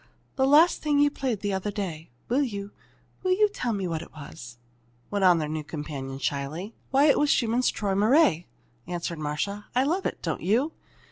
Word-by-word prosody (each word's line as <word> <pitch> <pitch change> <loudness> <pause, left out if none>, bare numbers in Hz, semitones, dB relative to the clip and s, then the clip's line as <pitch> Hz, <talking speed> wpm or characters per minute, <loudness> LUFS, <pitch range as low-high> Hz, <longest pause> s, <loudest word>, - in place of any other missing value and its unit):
"That 265 0 +2
last 310 +5 +5
thing 295 -2 +1
you 290 0 +4
played 250 -8 -2
the 205 -1 -1
other 190 +2 -2
day 185 -6 -5 0.2
will 255 +4 +2
you 205 -6 -3 0.5
will 370 -1 +2
you 420 +3 +4
tell 250 - -2
me 195 -4 -2
what 165 -2 -2
it - - -11
was?" 120 -6 -10 0.5
went 200 -1 0
on 180 -2 +6
their 155 -2 -1
new 155 0 -3
companion, 145 -3 -6
shyly. 140 - -3 0.2
"Why, 275 +2 +4
that 290 - +5
was 295 - +2
Schumann's 240 0 +2
'Träumerei,'" 205 - +2 0.4
answered 170 -2 -4
Marcia. 155 +8 -3
"I 255 - +4
love 345 +7 0
it, - - -5
don't - - -2
you?" 245 - +1
200 Hz, 190 wpm, -26 LUFS, 160-270 Hz, 0.5 s, on